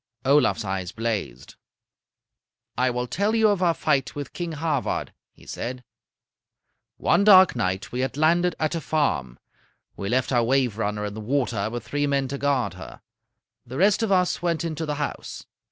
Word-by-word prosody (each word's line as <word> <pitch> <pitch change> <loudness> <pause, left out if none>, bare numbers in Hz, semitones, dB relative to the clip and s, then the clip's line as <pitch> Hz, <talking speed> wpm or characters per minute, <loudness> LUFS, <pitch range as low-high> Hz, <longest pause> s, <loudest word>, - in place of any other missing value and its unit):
Olaf's 135 -5 +3
eyes 95 -2 -3
blazed. 105 - -4 1.2
"I 130 +1 +2
will 125 0 -2
tell 200 - 0
you 220 -1 +4
of 200 -3 0
our 170 -2 +3
fight 140 -4 0
with 145 -1 -6
King 175 -2 -4
Havard," 150 -3 -2 0.2
he - - -20
said. 125 +1 -5 1.1
"One 200 - +2
dark 190 -5 +7
night 95 -4 -2
we 125 - -4
had 130 +2 -2
landed 170 +3 +3
at 155 +1 0
a 165 - -2
farm. 135 - -1 0.6
We 100 - -4
left 130 +3 0
our 120 -2 +3
'Waverunner' 115 -5 0
in 105 - -5
the 110 - -7
water 120 -3 -1
with 120 +1 -6
three 145 0 0
men 140 -1 0
to 140 +1 -4
guard 140 -3 0
her. - - -11 0.6
The 125 +3 -8
rest 200 +4 +3
of 225 -3 0
us 180 -2 +2
went 170 -1 0
into 160 -1 -3
the 150 - -1
house. 145 0 -5
140 Hz, 170 wpm, -24 LUFS, 115-165 Hz, 1.2 s, dark